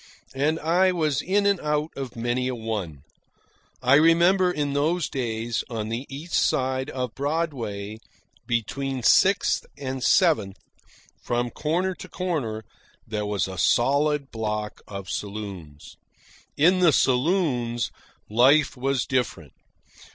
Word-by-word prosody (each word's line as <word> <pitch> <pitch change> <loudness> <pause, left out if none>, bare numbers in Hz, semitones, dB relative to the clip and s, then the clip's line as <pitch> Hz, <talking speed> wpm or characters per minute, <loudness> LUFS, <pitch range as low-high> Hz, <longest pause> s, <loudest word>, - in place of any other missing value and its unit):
And 150 +4 0
I 180 +4 +3
was 155 -6 0
in 200 +2 +1
and 200 -2 +3
out 150 +1 -1
of 135 -3 -6
many 120 +2 -1
a 130 - -2
one. 105 - -5 0.8
I 130 +2 +4
remember, 170 +5 +5
in 145 -4 -2
those 155 +3 +1
days, 115 -4 -2
on 110 -2 -4
the 120 +4 -4
east 145 +5 -8
side 130 -2 +1
of 125 -3 -4
Broadway, 125 -9 -3 0.5
between 130 +3 -2
Sixth 190 - +4
and 130 -2 -4
Seventh, 115 - +3 0.6
from 120 0 -1
corner 175 +5 -1
to - - -11
corner, 140 -12 -3 0.4
there 105 -1 -3
was 105 -2 0
a 95 -1 -7
solid 140 +5 +2
block 105 -1 -4
of 100 -2 -7
saloons. 100 -9 -7 0.6
In 180 +5 +4
the 175 -3 +5
saloons 125 - +1 0.4
life 135 +7 +4
was 135 0 -1
different. 110 - -2
130 Hz, 125 wpm, -25 LUFS, 110-155 Hz, 0.8 s, remember